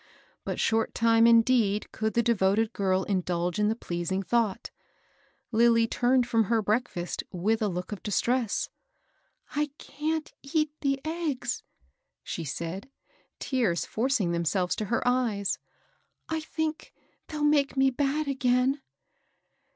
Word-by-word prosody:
But - - -3
short 225 0 +1
time 230 0 +5
indeed 230 -3 +3
could 220 0 -2
the 235 - +3
devoted 215 0 +2
girl 190 -1 +1
indulge 180 -2 -1
in 210 - +3
the 220 - +1
pleasing 190 -2 -3
thought: 215 0 0 0.8
Lilly 230 0 +4
turned 245 +1 +2
from 225 -2 +2
her 230 +3 +2
break 220 +4 +1
&st 175 0 -4
with 215 +6 0
a 215 - +2
look 180 0 -4
of 205 - -5
distress. 235 +2 0 0.9
^* - - -10
I 300 - +1
can't 310 +1 -3
eat 305 +2 0
the 275 -1 +1
eggs," 310 -7 -2 0.6
she 170 - -4
said, 170 - -5 0.5
tears 230 -11 0
forcing 230 -6 0
themselves 170 +2 0
to 215 - -2
her 230 +4 -1
eyes. 230 -6 +1 0.7
^^I 320 -1 -1
think 315 0 -4 0.3
they'll 300 -2 -4
make 290 -2 +3
me 270 0 +4
bad 285 +3 0
again." 265 0 +1
230 Hz, 135 wpm, -28 LUFS, 195-270 Hz, 0.9 s, time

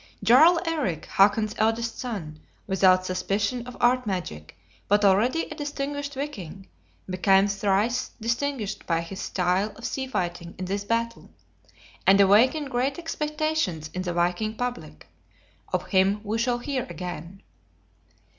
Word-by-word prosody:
Jarl 320 +8 +6
Eric, 290 - -2
Hakon's 210 +2 +3
eldest 225 +1 0
son, 185 - -5 0.3
without 185 -1 +3
suspicion 200 +6 -1
of 250 - -9
art 250 0 +2
magic, 125 - -5 0.3
but 205 +1 +3
already 225 +11 +3
a - - -7
distinguished 285 -1 -4
viking, 195 - -6 0.4
became 190 +1 +3
thrice 205 +4 0
distinguished 235 -2 -2
by 165 -1 +1
his 190 +3 -7
style 185 +3 0
of 230 - -10
sea 265 +1 -3
fighting 175 -7 -4
in 185 - -4
this 200 +2 -2
battle; 230 +1 -2 0.8
and 195 +1 +7
awakened 255 +9 +4
great 260 +3 0
expectations 305 - -2
in 185 - -3
the 180 -1 -3
viking 180 +6 0
public; 245 - -5 0.7
of - - -1
him 195 +2 +3
we 220 +2 -2
shall 240 +1 +1
hear 260 +1 -3
again. 175 +1 -7
210 Hz, 135 wpm, -25 LUFS, 185-250 Hz, 0.8 s, and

